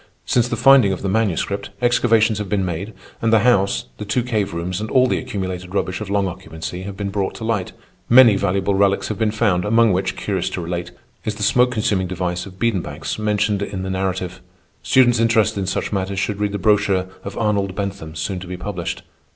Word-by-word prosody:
Since 120 -1 +2
the 120 - -2
finding 125 -3 +6
of 95 - -4
the 100 - 0
Manuscript 100 -1 -1
excavations 115 -3 +3
have 105 -2 -4
been 100 -3 0
made, 90 +5 -4 0.3
and 115 - +1
the 110 -2 +5
house, 100 -5 +2
the - - -4
two 110 +4 0
cave 110 -5 -1
rooms, 90 +3 -3
and 110 - -4
all 130 +3 +4
the 125 - 0
accumulated 95 -6 -5
rubbish 95 0 -1
of 105 - -5
long 100 -1 +1
occupancy 80 0 -7
have 100 - -9
been 100 -1 -3
brought 95 -1 -2
to - - -8
light. 110 -5 -1 0.4
Many 120 -3 +8
valuable 100 +1 0
relics 100 0 +2
have 110 - -4
been 110 -1 +2
found, 105 -5 +1
among 115 0 +4
which, 95 +1 -1
curious 95 -4 -2
to 90 - -4
relate, 85 +1 -4 0.3
is 105 - -2
the 105 - -5
smoke 125 +5 +4
consuming 105 -6 0
device 90 0 -3
of 95 -1 -13
Biedenbach's 110 -2 -2
mentioned 105 -1 0
in 100 -2 -4
the 95 - -3
narrative. 95 -1 -3 0.4
Students 120 -2 +4
interested 115 -3 +2
in 95 - -2
such 95 - -2
matters 95 0 -2
should 100 +1 -1
read 105 -1 -1
the - - -1
brochure 100 -2 +2 0.2
of - - -7
Arnold 100 -4 0
Bentham 100 -6 -5
soon 90 +4 -3
to 90 - -9
be 90 0 -5
published. 90 -2 -5
100 Hz, 210 wpm, -20 LUFS, 95-110 Hz, 0.4 s, Many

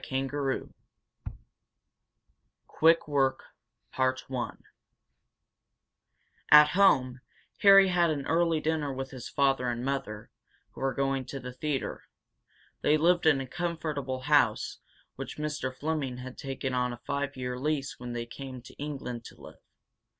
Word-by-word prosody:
CHAPTER 135 0 -1
II - - -6 2.0
QUICK 165 0 +3
WORK 135 -3 +1 0.6
At 130 -1 -1 2.1
home, 135 -10 +3 0.4
Harry 195 -1 +8
had 175 -2 +3
an 145 -3 -2
early 165 0 +2
dinner 155 -2 -1
with 135 0 -5
his 130 -2 -8
father 135 -3 +1
and 120 +1 -3
mother, 135 -6 -4 0.4
who - - -12
were 135 0 0
going 135 -1 0
to 135 +2 -6
the 125 -1 -8
theatre. 140 +1 -3 0.8
They 150 - +4
lived 175 +1 +3
in 145 -4 +5
a 135 - -3
comfortable 150 -4 -3
house, - - +2 0.4
which - - -7
Mr. 150 -3 -3
Fleming 140 -2 -3
had 125 0 -8
taken 135 -1 -4
on 125 -1 0
a - - -8
five 140 -1 -2
year 125 -1 -4
lease 140 -1 -2
when 120 0 -6
they 120 0 -3
came 130 0 -9
to - - -13
England 135 -5 -5
to - - -12
live. - - -13
135 Hz, 135 wpm, -29 LUFS, 130-150 Hz, 2.1 s, Harry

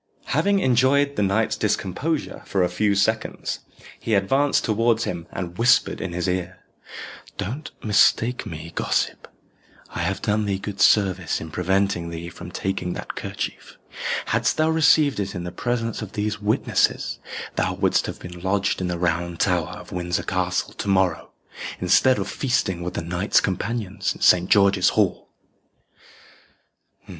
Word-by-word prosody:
Having 200 -1 +2
enjoyed 140 +1 +3
the - - 0
knight's 100 +3 +1
discomposure 105 - -2
for 95 -2 +1
a 90 - +1
few 100 +3 +1
seconds, 110 +3 -1 0.4
he 110 - 0
advanced 135 +9 +2
towards 115 +1 +2
him, 85 -4 -4
and 90 -2 -6
whispered 120 +2 +3
in 95 - -3
his 90 +1 -2
ear, 90 0 -2 0.8
"Don't 120 +10 -4
mistake 115 +3 +3
me, 80 -2 -7
gossip. - - -1 0.6
I - - -6
have 90 +3 -1
done 105 0 0
thee 100 -1 0
good 100 0 -6
service 95 -5 +3
in 80 0 -8
preventing 95 0 0
thee 85 +1 -6
from 85 0 -10
taking 95 -1 -3
that - - -6
kerchief. - - -6 0.5
Hadst - - +1
thou 155 +1 +3
received 155 -4 +4
it 100 -1 -3
in 90 - -4
the 90 - -5
presence 115 +4 -2
of 105 -3 -7
these 105 0 -2
witnesses, 105 +1 +1 0.4
thou - - 0
wouldst - - +1
have - - -5
been 90 -1 -9
lodged 95 +1 0
in 90 - -1
the 90 -1 -2
Round 85 0 -1
Tower - - +2
of - - -12
Windsor 90 -1 -2
Castle - - -1
to - - -6
morrow, 95 -3 +1 0.5
instead 130 -1 +4
of 100 -1 -2
feasting 95 -9 -1
with 90 +1 -4
the - - -2
knights 90 +4 +2
companions 100 +1 -2
in - - -14
Saint 90 0 +5
George's 100 -2 +5
Hall." 100 -4 +1
100 Hz, 155 wpm, -23 LUFS, 90-115 Hz, 0.8 s, Saint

